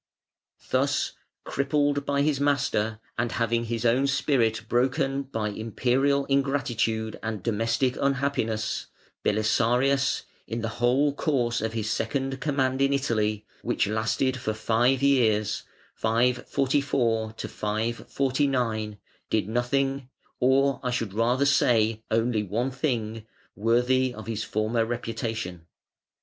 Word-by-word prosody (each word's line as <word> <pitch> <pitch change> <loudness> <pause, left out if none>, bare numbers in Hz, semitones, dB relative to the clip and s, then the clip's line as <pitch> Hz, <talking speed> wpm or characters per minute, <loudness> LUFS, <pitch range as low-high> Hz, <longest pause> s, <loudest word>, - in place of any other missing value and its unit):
Thus - - +1 0.3
crippled 145 0 0
by 140 0 +2
his 145 -2 +1
master, 130 -6 +1 0.2
and 120 -1 0
having 115 0 0
his 115 0 -3
own 125 +4 +3
spirit 115 -6 +1
broken 130 +3 +1
by 115 -6 -3
Imperial 130 +6 +1
ingratitude 120 -5 0
and 110 -4 -4
domestic 115 +3 +1
unhappiness, 135 -5 0 0.4
Belisarius, 125 +6 +2 0.2
in 115 +1 -3
the 115 - -1
whole 135 +4 +3
course 125 -6 0
of 110 0 -2
his 110 -2 -2
second 135 +4 -2
command 135 -2 0
in 140 0 +3
Italy, 110 -6 0 0.2
which - - 0
lasted 110 +5 0
for 110 -3 -3
five 120 +4 +2
years 110 -7 +2 0.3
(544 120 0 +1
549) 115 0 -1 0.3
did 105 -3 +1
nothing, 135 +3 0 0.3
or 135 +2 +3
I 125 - -2
should 115 -5 -2
rather 120 +5 +2
say 115 -5 +3
only 115 0 +1
one 115 +6 -1
thing, 115 -5 -2 0.3
worthy 125 +4 +2
of 110 - -8
his 110 -1 -3
former 110 +2 0
reputation. 115 -7 -4
120 Hz, 115 wpm, -26 LUFS, 110-135 Hz, 0.4 s, own